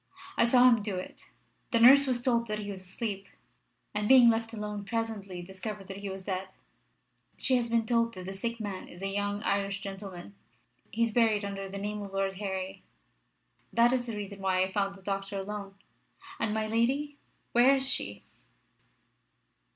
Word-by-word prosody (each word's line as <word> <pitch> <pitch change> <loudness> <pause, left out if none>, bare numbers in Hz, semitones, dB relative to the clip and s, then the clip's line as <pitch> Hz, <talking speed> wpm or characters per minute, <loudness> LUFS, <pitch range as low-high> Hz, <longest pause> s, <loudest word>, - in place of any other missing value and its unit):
I - - +4
saw 250 +1 +6
him 230 -3 +5
do 205 -2 -3
it. 185 - -8 0.4
The 230 - +2
nurse 270 +4 +8
was 245 -2 0
told 235 -2 +2
that 215 0 -2
he 205 -1 -5
was 190 -1 -6
asleep, 195 +1 -5 0.7
and 210 0 -1
being 250 -2 +8
left 225 0 -2
alone 210 -2 -5
presently 205 -4 -4
discovered 190 +2 -6
that 195 - -6
he 200 0 -5
was 190 0 -6
dead. 190 -1 -3 0.9
She 260 - +2
has 235 -1 -1
been 230 -1 +2
told 230 -1 +1
that 185 -1 -7
the 190 - -5
sick 230 +4 -3
man 200 -3 -5
is 175 +2 -11
a - - 0
young 205 +1 -2
Irish 200 -1 0
gentleman. 195 -1 -8 0.6
He 230 - 0
is 230 - +1
buried 220 -3 +3
under 195 -1 -5
the 200 - -6
name 210 +1 -3
of 200 -1 -8
Lord 195 -1 -1
Harry. 190 -1 -4 0.9
That 235 +1 +4
is 250 -1 0
the 230 - -4
reason 200 -1 -7
I 190 0 +2
found 195 0 -1
the 195 - -16
doctor 195 0 -3
alone. 200 0 -5 0.6
And 210 - 0
my 220 0 0
lady? 265 +7 0 0.3
Where 250 +3 +6
is 265 0 +2
she?" - - +1
205 Hz, 180 wpm, -30 LUFS, 195-230 Hz, 0.9 s, nurse